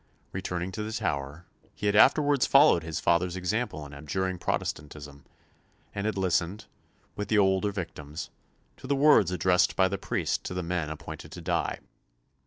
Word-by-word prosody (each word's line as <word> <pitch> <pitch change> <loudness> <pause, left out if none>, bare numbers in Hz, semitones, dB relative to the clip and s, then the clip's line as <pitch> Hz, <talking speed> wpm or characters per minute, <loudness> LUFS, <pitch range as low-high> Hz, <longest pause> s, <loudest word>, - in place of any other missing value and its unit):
Returning 90 -1 -3
to 100 - -5
the 105 +1 -4
Tower, 75 -5 -3 0.3
he - - -6
had 100 0 +2
afterwards 140 +4 +5
followed 140 - +6
his 80 -1 -4
father's 85 +1 +1
example 95 -4 -2
in 70 - -11
abjuring 90 +6 -3
Protestantism, 75 -2 -4 0.7
and 100 +1 -2
had 110 -3 -2
listened, 95 +2 0 0.5
with 105 -1 -4
the 110 - +2
older 95 0 +3
victims, 80 -5 -6 0.5
to - - -10
the 140 - +1
words 140 - +5
addressed 90 0 +2
by 95 - +4
the 100 0 -3
priest - - -2
to 90 - -4
the 90 - -2
men 85 -2 -2
appointed 80 - -8
to - - -8
die. - - -1
90 Hz, 165 wpm, -28 LUFS, 80-105 Hz, 0.7 s, followed